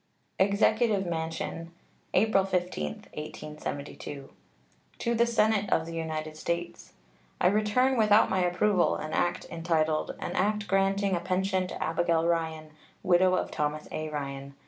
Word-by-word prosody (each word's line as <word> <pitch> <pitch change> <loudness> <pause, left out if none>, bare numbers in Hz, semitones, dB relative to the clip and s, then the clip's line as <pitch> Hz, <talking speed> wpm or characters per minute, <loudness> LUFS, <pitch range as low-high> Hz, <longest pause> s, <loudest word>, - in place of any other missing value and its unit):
EXECUTIVE 200 +1 +3
MANSION, 165 0 -4 0.4
April 215 -3 +4
15, 180 - -1 0.3
1872. 145 -2 -7 0.7
To 235 - -1
the 235 +1 +3
Senate 215 -3 +2
of 160 - +2
the 165 - -7
United 155 -1 -4
States: 170 +2 -4 0.5
I - - +1
return 215 +7 +3
without 215 -1 +5
my 190 - 0
approval 180 +1 +2
an 155 0 -5
act 175 0 0
entitled 160 -2 0
"An - - -4
act 210 +1 0
granting 195 0 +2
a - - 0
pension 185 +1 0
to - - -4
Abigail 165 0 +1
Ryan, 160 -2 -1 0.3
widow 185 +1 +4
of - - -2
Thomas 150 +1 -2
A. 155 0 -3
Ryan." 140 -2 -5
175 Hz, 135 wpm, -28 LUFS, 160-200 Hz, 0.7 s, without